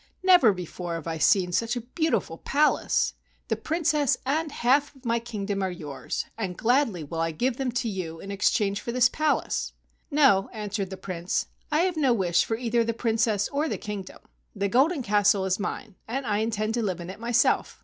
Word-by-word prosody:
Never 360 - +7
before 180 -2 -5
have 165 - -6
I 165 -1 -3
seen 185 0 +3
such 230 +6 0
a 245 - -3
beautiful 255 - -1
palace. 300 +2 +2 0.4
The - - +2
Princess 305 -4 +1
and 305 +4 0
the - - -12
half 280 +4 +2
of 265 -1 -20
my 235 0 +1
king¬ 225 -4 -5
dom 200 -1 -2
are 190 - 0
yours, 155 -6 -5
and 185 -5 -3
gladly 235 - +2
will 165 +3 -5
I 165 - +1
give 235 +10 -1
them 265 -2 -1
to 245 -1 -1
you 180 -6 -4
in 195 - -7
exchange 200 0 +1
for 235 - -4
the 250 +1 +5
palace." 310 -1 0 0.4
"No," 270 -10 +4
answered 205 -3 -3
the 190 - -7
Prince, 180 +1 -2 0.3
"I 305 +2 +3
have 360 -2 0
no 270 -5 +3
wish 180 -6 +2
for 225 - -2
either 235 -1 +1
the 230 0 -2
Princess 225 -3 +1
or 295 +3 -1
the - - -2
kingdom. 210 -4 -7 0.4
The 200 0 0
Golden 270 - +2
Castle 205 -2 +3
is 190 +1 0
mine 210 +1 -4
and 265 +4 -3
I 210 -2 0
intend 220 0 -1
to 235 - 0
live 190 -5 -2
in 175 +1 -6
it 195 - -12
myself." 235 +1 +1
220 Hz, 205 wpm, -26 LUFS, 190-255 Hz, 0.4 s, Never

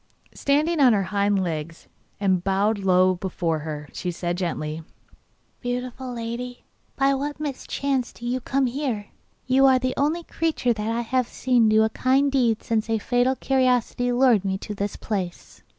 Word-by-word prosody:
Standing 300 +4 +1
on 255 -4 +6
her 200 -2 +2
hind 200 -1 +2
legs, 165 -1 -5 0.3
and 190 -3 +1
bowing 200 +2 +1
low 185 0 +4
before 175 -3 -2
her, 150 -1 -6
she 180 - -3
said 175 0 -2
gently: 160 -3 -3 0.8
'Beautiful 250 +1 -4
lady, 240 +1 -5 0.3
by 275 0 +3
what 290 +2 -3
mischance 275 -2 -2
do 240 - -11
you 250 +2 0
come 270 +2 +1
here? 245 -5 -3 0.4
You 265 +1 +5
are 260 -1 +5
the 255 0 -1
only 310 +5 +1
creature 320 -8 0
that 215 0 -3
I 230 +1 0
have 250 +1 0
seen 245 -4 +2
do 215 0 +5
a 220 - +2
kind 270 +4 +2
deed 240 -5 +1
since 225 -1 -1
a 225 - +2
fatal 245 +4 +1
curiosity 250 -2 +1
lured 245 -5 +4
me 190 -1 -1
to 210 - -6
this 200 0 -3
place. 190 -5 -5
235 Hz, 165 wpm, -24 LUFS, 195-260 Hz, 0.8 s, on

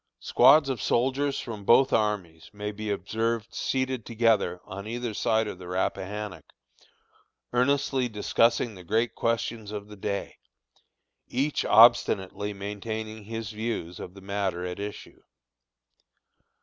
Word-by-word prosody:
Squads 145 +1 +6
of 130 -6 -2
soldiers 135 +3 +1
from 110 -4 -6
both 130 +6 +5
armies 95 -7 -1
may 105 0 -5
be 105 +1 -5
observed 110 +3 -2
seated 130 -2 -1
together 110 -6 +1
on 100 +2 -7
either 120 0 -3
side 110 +1 +1
of 95 - -6
the 90 - -9
Rappahannock, 95 +2 -3 1.0
earnestly 130 0 +2
discussing 115 +2 +2
the 90 -2 -12
great 110 +6 0
questions 115 -2 -2
of 105 -1 -6
the 105 - -10
day, 100 0 -4 0.9
each 140 +4 0
obstinately 110 -3 +5
maintaining 110 +2 -5
his 115 0 -5
views 105 -6 -4
of 90 - -8
the 100 - -12
matters 95 -2 -2
at 90 - -7
issue. 105 0 -7
110 Hz, 125 wpm, -27 LUFS, 100-115 Hz, 1.0 s, Squads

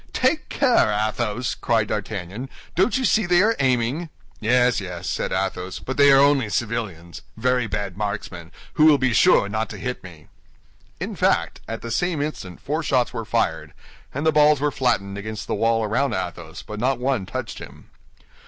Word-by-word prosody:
"Take 280 +5 +1
care, 250 - +3
Athos!" 110 +2 -1
cried 110 -3 0
D'Artagnan; 105 +3 -4 0.2
"don't 195 +9 +2
you 260 - 0
see 215 -5 +2
they 175 +1 +4
are 225 +2 +3
aiming?" 130 +5 0 0.3
"Yes, 125 +2 +3
yes," 90 -2 -6
said - - -2
Athos; 95 -1 -2
"but 130 - -5
they 140 -1 +6
are 135 - +7
only 140 -5 +3
civilians—very 115 +3 -2
bad 100 -3 -4
marksmen, 100 -4 -5 0.2
who 155 - +4
will 155 -2 +7
be 130 -3 +1
sure 100 - +5
not 110 +2 -2
to - - -7
hit 125 0 -5
me." 85 -5 -13 0.7
In - - -4
fact, - - +1
at 115 - -6
the 115 - -5
same 175 +5 0
instant 145 - -5
four 150 +4 -2
shots 130 -5 +1
were 115 - -4
fired, 80 -9 -1 0.4
and 140 +4 -4
the 160 - +5
balls 150 -1 +5
were 145 +1 0
flattened 100 -7 -1
against 110 +1 -6
the - - -3
wall 115 0 +1
around 115 +3 0
Athos, 85 -2 -6
but 105 0 -7
not 130 +3 +1
one 125 -6 -1
touched - - -5
him. - - -13
115 Hz, 180 wpm, -23 LUFS, 100-140 Hz, 0.7 s, are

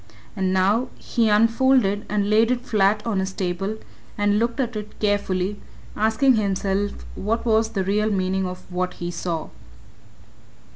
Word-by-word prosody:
And 190 -2 0
now 200 +7 +2
he 230 -2 0
unfolded 230 -1 +3
and 205 -1 0
laid 220 +2 +4
it 250 0 -1
flat 210 0 +2
on 220 -4 0
his 190 0 -2
table 195 +3 -2 0.4
and 205 0 +2
looked 235 +4 -1
at 245 -3 -1
it 210 0 -7
carefully, 205 -1 0 0.3
asking 225 +4 +3
himself 200 0 -1
what 225 +4 -2
was 220 -1 +3
the 200 -4 -2
real 210 +3 +1
meaning 190 -1 0
of 180 0 -7
what 180 0 -2
he 175 0 -4
saw. 170 -2 -3
205 Hz, 150 wpm, -23 LUFS, 190-225 Hz, 0.4 s, laid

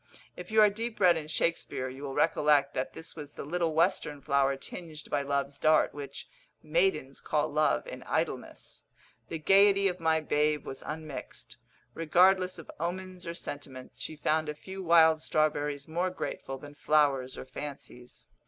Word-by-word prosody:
If - - -9
you 220 0 +5
are 210 - +7
deep 225 +2 -4
read 180 -3 +6
in 155 -2 -4
Shakespeare, 145 -5 -1
you 130 +1 -9
will 140 -2 -5
recollect 145 -2 +3
that 130 - -3
this 160 - -4
was 145 -2 -9
the - - -7
little 165 0 -1
western 165 -4 +1
flower 140 0 +2
tinged 155 +1 -8
by - - +1
love's 140 0 -2
dart, 155 0 +4
which 140 -1 -7 0.4
"maidens 390 -6 0
call - - 0
love - - +1
in - - -8
idleness." - - -3 0.4
The 165 - -3
gaiety 195 +4 +5
of 180 -1 -2
my 160 -1 +2
babe 150 -1 0
was 135 - -7
unmixed; 155 -2 -7 0.4
regardless 185 +3 +3
of 165 - -10
omens 180 +1 -4
or 170 - -4
sentiments, 135 -5 -7
she 160 - -4
found 155 +1 0
a 150 - -4
few 190 +5 -8
wild 160 -2 +5
strawberries 145 -2 0
more 175 +3 -1
grateful 135 -6 -5
than 145 +2 -11
flowers 140 -4 +1
or - - -7
fancies. 130 -2 -9
155 Hz, 165 wpm, -29 LUFS, 145-175 Hz, 0.4 s, are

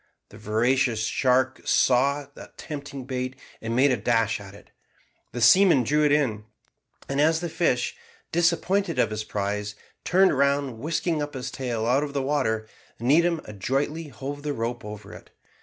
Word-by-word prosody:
The 100 - -14
voracious 115 +2 +1
shark 130 +3 +1
saw 140 +3 +2
the - - -12
tempting 140 -3 -7
bait, 130 0 -4 0.3
and 115 +1 -3
made 135 +2 +4
a 125 - +1
dash 115 0 +1
at 100 -1 -11
it. - - -17 0.6
The 120 - -5
seaman 165 - +6
drew 150 +6 +2
it 150 - +3
in, 120 -8 +1 0.6
and 140 +1 0
as 160 +2 +3
the 175 0 -4
fish, 145 -7 0 0.4
disappointed 175 +1 +1
of 110 - +2
his 110 0 -3
prize, 105 0 -3 0.3
turned 190 -2 +4
round 140 -3 +1
whisking 160 +3 -1
up 145 -1 -5
his 130 0 -5
tail 120 -4 -3
out 125 +4 +3
of 145 -1 -4
the 140 -1 -1
water, 110 -6 0 0.3
Needham 160 +7 +3
adroitly 135 - -2
hove 145 0 -7
the 145 0 -3
rope 120 0 -3
over 105 0 -9
it. - - -13
130 Hz, 165 wpm, -25 LUFS, 115-150 Hz, 0.6 s, seaman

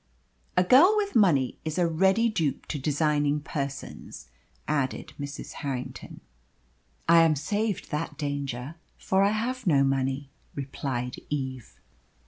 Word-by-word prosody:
"A 180 - +6
girl 290 - +7
with 405 -1 -1
money 160 - +3
is 160 +1 -3
a 175 - +3
ready 190 +7 +3
dupe 165 -10 -1
to 150 - -2
designing 145 0 +1
persons," 140 -2 -6 0.4
added 140 -4 -1
Mrs. 140 0 -6
Harrington. 130 -3 -5 0.9
"I 170 0 +7
am 160 -2 +4
saved 205 +7 -2
that 150 -1 -3
danger, 140 0 -4 0.2
for 190 0 +1
I 200 - +5
have 235 +3 -2
no 140 -5 +5
money," 135 +1 -1 0.2
replied 130 -3 -4
Eve. 130 -4 -4
150 Hz, 125 wpm, -27 LUFS, 135-185 Hz, 0.9 s, girl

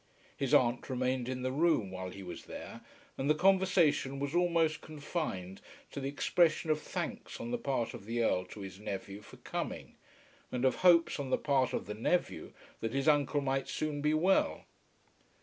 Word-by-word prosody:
His 135 -2 -2
aunt 120 +1 +3
remained 130 -1 -1
in 130 -1 -3
the 130 - 0
room 145 - +2
while 95 0 -5
he 95 +1 -9
was 90 - -8
there, - - -8 0.4
and 135 +2 0
the 155 - +5
conversation 180 -6 +3
was 140 +1 -3
almost 170 -3 +2
confined 145 - -4 0.3
to - - -5
the 135 0 -2
expression 160 +2 +2
of 155 0 0
thanks 195 +12 -5
on 240 -2 -5
the 245 - 0
part 130 - -1
of 115 -5 -9
the 115 +2 -1
Earl 90 -4 +1
to 100 +3 -10
his 95 -1 -8
nephew 100 -1 -5
for - - -14
coming, - - -5 0.5
and 125 +1 -1
of 130 - +3
hopes 170 -4 +5
on 140 -2 -3
the - - +2
part 135 -4 +1
of - - -2
the 105 - -5
nephew 120 +12 -1 0.3
that 115 +1 -3
his 135 +1 0
uncle 145 -1 +3
might 135 0 -1
soon 150 -1 -2
be 150 +1 +2
well. 185 +5 +2
140 Hz, 185 wpm, -32 LUFS, 120-160 Hz, 0.5 s, the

